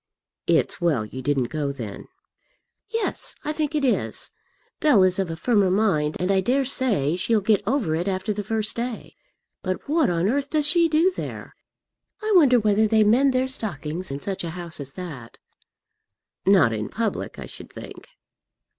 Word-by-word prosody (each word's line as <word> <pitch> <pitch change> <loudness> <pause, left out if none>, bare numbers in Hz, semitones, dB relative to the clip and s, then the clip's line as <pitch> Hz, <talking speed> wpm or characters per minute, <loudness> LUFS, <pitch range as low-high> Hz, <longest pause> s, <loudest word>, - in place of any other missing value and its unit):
"It's - - +1
well 150 -11 +1
you 130 +5 -7
didn't 130 -2 0
go 145 -2 -1
then." 115 -7 -7 0.8
"Yes, 455 +1 -3
I 300 - -1
think 305 0 -2
it 295 -2 +1
is. 250 - -1 0.5
Bell 265 -11 +5
is 185 0 +2
of 190 -3 -1
a 165 - -3
firmer 205 +1 +2
mind, 180 -7 +1
and 180 +2 0
I 190 -1 +3
dare 265 +7 +1
say 215 - +1
she'll 215 +5 +2
get 205 0 +2
over 230 - +1
it 170 +4 -2
after 195 +2 -1
the 205 0 -4
first 220 +1 -2
day. 235 -1 -5 0.5
But 185 0 -4
what 305 -1 +2
on 175 +1 +1
earth 280 +5 0
does 305 -1 +1
she 335 +2 +4
do 325 +5 +3
there? - - -7 0.6
I 430 -1 -1
wonder 270 -8 +6
whether 215 0 +3
they 220 0 +4
mend 250 +6 +4
their 255 0 +1
stockings 180 - -5
in 140 +1 -4
such 195 +1 -3
a 170 - -3
house 170 -3 -6
as 135 -1 -8
that." 150 -11 -8 1.1
"Not 185 - +5
in 110 -1 -3
public, 225 -1 -3
I - - -6
should - - -11
think." - - -10
205 Hz, 180 wpm, -24 LUFS, 165-260 Hz, 1.1 s, wonder